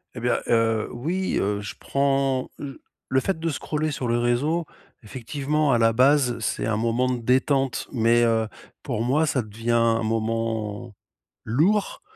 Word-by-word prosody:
Et - - -5
bien, 120 +1 +1
heu, 115 -1 +2
oui, 170 +10 -2
heu, 100 +1 -1
je 105 - -7
prends 135 -2 0
l 135 -2 -7 0.3
le 130 - +4
fait 175 +4 -2
de 165 0 -1
scroller 155 +2 -2
sur 135 -4 -3
les 120 0 +1
réseaux, 145 +8 0 0.4
effectivement, 140 +6 -1
à 120 - +3
la 115 0 +4
base, 130 0 +3
c'est 110 - -2
un 110 -2 0
moment 115 +3 +1
de 125 - -2
détente, 130 +1 +1
mais 120 -1 +3
heu, 115 -1 +2 0.4
pour 120 -6 -2
moi, 140 +6 +2
ça 140 -4 0
devient 115 +2 -4
un 115 -1 +3
moment 115 0 -2 0.5
lourd 190 - +1
120 Hz, 165 wpm, -24 LUFS, 115-140 Hz, 0.5 s, le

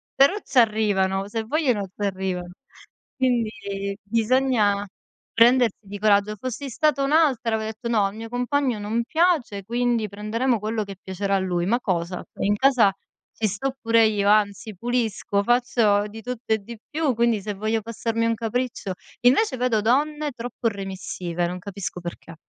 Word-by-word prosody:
però 280 +9 +5
ci 275 - -4
arrivano, 200 -4 +2
se 225 +1 -2
vogliono 245 -6 0
ci 200 +2 -5
arrivano. 185 -2 -3 0.7
Quindi 215 -6 -1
bisogna 220 -2 +2 0.5
prendersi 240 -1 +5
di 200 +1 -7
coraggio. 210 0 +3
Fossi 255 +2 -5
stata 280 +1 +1
un'altra 275 -6 +2
avrei 220 0 -3
detto: 220 +2 -6
"No, 215 -4 +3
al 195 +2 -3
mio 225 0 -7
compagno 250 -1 0
non 220 +3 -1
piace, 310 - +1
quindi 235 0 0
prenderemo 220 +5 -1
quello 215 +1 -2
che 195 -1 -8
piacerà 195 +1 -2
a - - +2
lui". 175 -2 -1
Ma 235 +5 +2
cosa? 180 -1 -2 0.2
In 205 +1 +2
casa 250 -5 +4 0.4
ci 220 - -2
sto 260 +7 -3
pure 230 0 +4
io, 205 -2 +2
anzi, 210 0 +2
pulisco, 225 -2 -1
faccio 235 -3 +2
di 220 +2 -10
tutto 245 -2 -3
e 220 - +1
di 230 +3 -10
più, 300 -4 0
quindi 235 -2 +2
se 210 +1 -4
voglio 215 +2 -1
passarmi 230 +1 -2
un 230 0 +1
capriccio. 230 -3 -3 0.3
Invece, 260 - +3
vedo 240 -4 +1
donne 295 +5 +1
troppo 240 0 -4
remissive, 185 -3 -4
non 180 +1 -4
capisco 195 -2 -6
perché. 170 -1 -8
220 Hz, 160 wpm, -24 LUFS, 200-245 Hz, 0.7 s, però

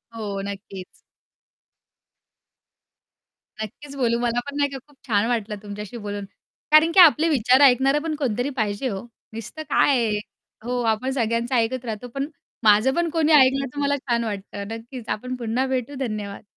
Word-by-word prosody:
हो, 200 -3 -4
नक्कीच. 195 -2 -9 2.6
नक्कीच 280 +7 -10
बोलू, 235 -3 +1
मला 240 0 0
पण 285 - -8
नाही 285 -1 +2
का 270 - -6
खूप 290 - -23
छान 210 -1 +2
वाटलं 220 -3 -1
तुमच्याशी 210 +3 -7
बोलून. 205 -2 -5 0.5
कारण, 310 +2 +6
की 375 - +4
आपले 325 -1 +7
विचार 255 -1 +4
ऐकणारं 270 +2 +5
पण 315 -2 -2
कोणीतरी 250 -2 -1
पाहिजे 210 +4 -1
हो. 195 -2 -4 0.3
नुसतं 230 +8 -7
काय 280 - +4
आहे? 210 -1 0 0.5
हो, 245 +1 -2
आपण 250 +5 -2
सगळ्यांचं 235 0 0
ऐकत 240 +2 0
राहतो, 225 +2 -5
पण 275 +1 -1 0.4
माझं 215 +5 +5
पण 340 -1 +1
कोणी 320 -1 +1
ऐकलं 275 -1 +5
तर 290 - -5
मला 285 0 +2
छान 235 -3 -1
वाटतं. 200 -1 -5
नक्कीच 235 +1 -10
आपण 255 +4 -3
पुन्हा 240 +2 -1
भेटू. 260 +1 -2
धन्यवाद. 210 -6 -4
245 Hz, 160 wpm, -23 LUFS, 215-275 Hz, 2.6 s, आपले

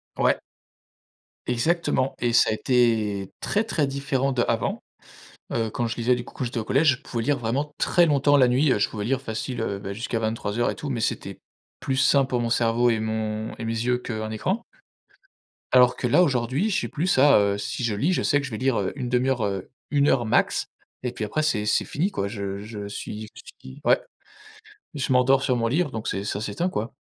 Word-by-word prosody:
Ouais. - - +2 1.1
Exactement 135 +1 +1
et 120 -1 0
ça 115 - +5
a - - +1
été 110 -5 +1
très, 210 - +1
très 155 -10 0
différent 135 0 -1
d'avant. 120 -2 -1 0.7
Heu, 115 -2 0
quand 120 - -2
je 115 - -3
lisais, 120 +1 +2
du 120 - -5
coup, - - -14
quand - - -5
j'étais 120 -1 -3
au 110 - -2
collège, 135 +2 +3
je - - -27
pouvais 115 -2 -4
lire 145 0 +1
vraiment 130 +6 -2
très 175 -1 +4
longtemps 145 -1 +3
la 130 -3 +5
nuit, 130 +3 +3
heu, 105 - +1
je - - +2
pouvais 105 -2 -5
lire 130 +2 0
facile, 115 +1 -4
heu, 100 -3 -2
beh, 100 0 -6
jusqu'à 115 +2 -3
23:00 110 +1 -1
et - - -5
tout, 145 - -6
mais 120 - -2
c'était 100 -3 -3 0.4
plus 130 - -1
sain 135 +1 +4
pour 125 -2 -1
mon 115 - -1
cerveau 120 +1 +2
et 110 - +1
mon 110 0 -3
et 115 - -5
mes 115 - -1
yeux 120 +2 0
qu'un 110 -3 -5
écran. 190 - -1 1.1
Alors 125 -1 +5
que 125 - -1
là, 180 +9 +5
aujourd'hui, 130 - 0
j'ai 200 - 0
plus 165 +5 -2
ça, 140 -5 +6
heu, 100 0 +1
si 100 +4 -4
je 115 -3 0
lis, 145 - +1
je - - 0
sais 145 - +3
que 140 - -4
je 135 - -9
vais 110 - -4
lire 125 -6 0
1/2 125 -1 0
heure, 125 -5 +1
heu, 95 -2 -3 0.2
1 145 -1 +3
heure 120 -3 +3
max, 110 - +1 0.4
et 125 - -1
puis 115 -3 -4
après, 155 +8 -1
c'est 105 -8 0
c'est 105 - +2
fini, 175 +8 -1
quoi, 100 - -3
je 100 -2 -4
je 105 -1 -7
suis 105 +1 -6
je - - -11 0.2
suis 130 +2 -12
ouais, - - +4 1.0
je 135 -2 0
m'endors 130 +1 +4
sur 125 - +1
mon 115 -1 0
livre 145 +5 0
donc 110 -3 -5
c'est 100 - -2
ça 100 0 -3
s'éteint, 110 - -2
quoi. 115 -9 -3
120 Hz, 220 wpm, -24 LUFS, 110-135 Hz, 1.1 s, ça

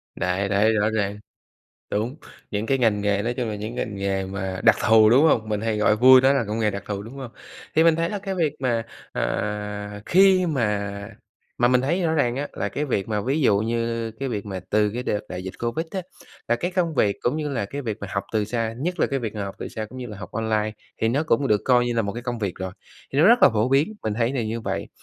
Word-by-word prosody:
Đấy 95 +2 -1
đấy 105 +3 +3
rõ 105 0 +2
ràng, 105 -2 -1 0.7
đúng, 115 +7 -1 0.4
những 105 +2 -2
cái 135 +2 +1
ngành 110 -5 +2
nghề 100 0 +1
nói 120 +3 -1
chung 120 -3 -2
là 105 - -3
những 110 +4 -6
ngành 105 -4 -3
nghề 95 -1 -1
mà 95 -1 -4
đặc - - +6
thù, 110 -1 +7
đúng 130 +6 +6
hông? 110 -8 +2
Mình 105 -1 -1
hay 110 -1 -1
gọi 105 0 +3
vui 130 +3 +8
đó 135 +1 +5
là 135 -4 +1
công 110 +2 -2
nghề 105 -2 +2
đặc 100 0 -5
thù, 100 -1 -3
đúng 115 +5 -10
hông? 130 -4 -8 0.4
Thì 160 - +5
mình 165 -1 +5
thấy 165 +1 0
là 205 - -3
cái 195 -1 -4
việc 155 -5 +1
mà, 120 -3 0 0.3
à, 105 0 -3
khi 190 0 +5
mà 105 -9 0 0.7
mà 120 - +4
mình 125 0 +3
thấy 170 +8 0
rõ 160 -1 +1
ràng 125 -6 +1
á, 145 +2 -2
là 100 - -2
cái 150 +2 -2
việc 100 -7 -1
mà, 105 -2 -1
ví 140 +6 0
dụ 100 -6 +4
như 115 0 -2
cái 135 +4 -5
việc 105 -3 -4
mà 95 -2 -5
từ 105 -1 +2
cái 125 +1 -3
đợt 105 - 0
đại 90 0 -5
dịch 95 -1 -6
Covid 120 +8 -2
á, 190 - -3 0.5
là 120 - +3
cái 175 +9 -3
công 175 -3 0
việc 100 -4 +2
cũng 135 +6 0
như 150 -1 -2
là 120 -7 -2
cái 140 +7 -6
việc 110 -4 -3
mà 100 - -4
học 100 +1 -1
từ 105 -1 +1
xa, 115 0 -2
nhất 180 +3 -2
là - - +3
cái 135 -2 -1
việc 110 -2 -5
mà 100 - -3
học 100 - -6
từ - - -5
xa 110 -1 -5
cũng 130 +4 -12
như 125 -1 -6
là 105 -2 -8
học 95 -4 -9
online, 110 -1 -1 0.3
thì 110 - +3
nó 140 +7 +1
cũng 145 -3 +1
được 105 -1 +2
coi 125 -1 +4
như 120 - -1
là 115 - +2
một 100 -1 -3
cái 120 +1 -6
công 120 -2 -3
việc 100 -4 -2
rồi, 95 -1 -5 0.4
thì 140 - +2
nó 165 - +6
rất 240 +2 +6
là - - +9
phổ 110 +2 0
biến, 145 +10 +2
mình 110 - -1
thấy 115 +3 0
là 125 - 0
như 115 +1 -3
vậy. - - -3
115 Hz, 275 wpm, -24 LUFS, 105-135 Hz, 0.7 s, là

